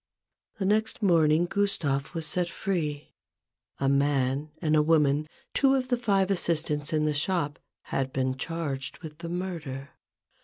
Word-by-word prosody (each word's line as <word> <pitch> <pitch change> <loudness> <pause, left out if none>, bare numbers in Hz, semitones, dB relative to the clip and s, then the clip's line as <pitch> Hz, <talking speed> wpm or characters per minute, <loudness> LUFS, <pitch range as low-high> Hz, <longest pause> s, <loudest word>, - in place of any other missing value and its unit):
The 195 - -2
next 215 +2 +1
morning, 165 -3 +4
Gustave 170 -8 0
was 165 -1 0
set 175 +2 0
free. 155 -7 -3 0.6
A 135 - 0
man 140 +1 +1
and 155 -2 +2
a 150 - +5
woman, 150 -1 +3 0.2
two 270 -1 +4
of 255 -1 -1
the 250 - +3
five 200 -5 +2
assistants 155 -4 0
in 155 -1 +1
the 150 - +1
shop, 150 -1 0 0.2
had 135 -1 -2
been 130 0 0
charged 140 -2 -3
with 155 -1 -9
the 170 -1 -6
murder. 160 -7 -4
155 Hz, 150 wpm, -28 LUFS, 145-180 Hz, 0.6 s, a